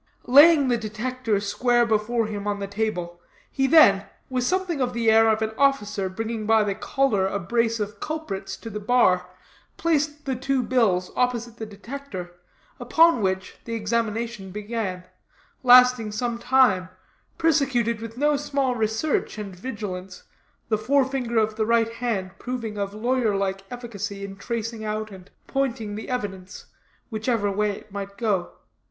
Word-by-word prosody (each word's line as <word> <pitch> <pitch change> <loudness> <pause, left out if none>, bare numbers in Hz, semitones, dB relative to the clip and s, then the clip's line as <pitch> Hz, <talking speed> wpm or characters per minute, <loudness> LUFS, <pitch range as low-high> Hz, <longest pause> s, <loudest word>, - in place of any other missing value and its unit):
Laying 290 +2 +7
the 240 -1 +2
Detector 220 0 -2
square 240 +4 +2
before 225 +1 +1
him 205 -1 -5
on 205 0 0
the 200 - -3
table, 195 -4 -3 0.3
he 270 0 +1
then, 205 -11 +6 0.2
with 255 -1 0
something 355 0 0
of 250 -1 0
the 230 -2 +2
air 225 0 +6
of 220 0 +2
an 220 - -2
officer 210 -8 +1
bringing 220 +2 -4
by 220 -1 +5
the 205 -1 -1
collar 215 -2 +1
a 200 - -2
brace 230 +3 0
of 205 -1 -4
culprits 195 -12 -5
to 225 - -9
the 210 - -4
bar, 200 -5 +3 0.5
placed 300 -2 0
the 265 -2 -1
two 265 +1 0
bills 215 -8 +1
opposite 240 -2 -1
the 220 - -6
Detector, 205 -4 -8 0.5
upon 330 -6 +4
which, 190 -1 -2
the 230 - -4
examination 225 -1 -2
began, 205 -2 -4 0.6
lasting 250 -3 +6
some 235 +2 -2
time, 235 -8 +3 0.5
prosecuted 265 -8 +1
with 230 +1 -8
no 295 +2 +3
small 275 -2 0
research 220 +4 -1
and 200 -3 -6
vigilance, 190 -4 -6 0.5
the 215 -2 +1
forefinger 265 -2 +1
of 215 -1 +1
the 220 - +1
right 230 -1 +2
hand 225 -6 -2
proving 240 -4 -4
of 200 0 -3
lawyer 235 -1 +1
like 195 0 -1
efficacy 205 -5 -6
in 195 0 -8
tracing 230 +1 -4
out 215 0 -3
and 190 0 -12 0.2
pointing 235 -6 -2
the 215 +2 -7
evidence, 200 -7 -5 0.5
whichever 220 -2 0
way 210 +1 +1
it 205 +1 -7
might 200 0 -6
go. 205 -7 -1
225 Hz, 155 wpm, -24 LUFS, 205-250 Hz, 0.6 s, Laying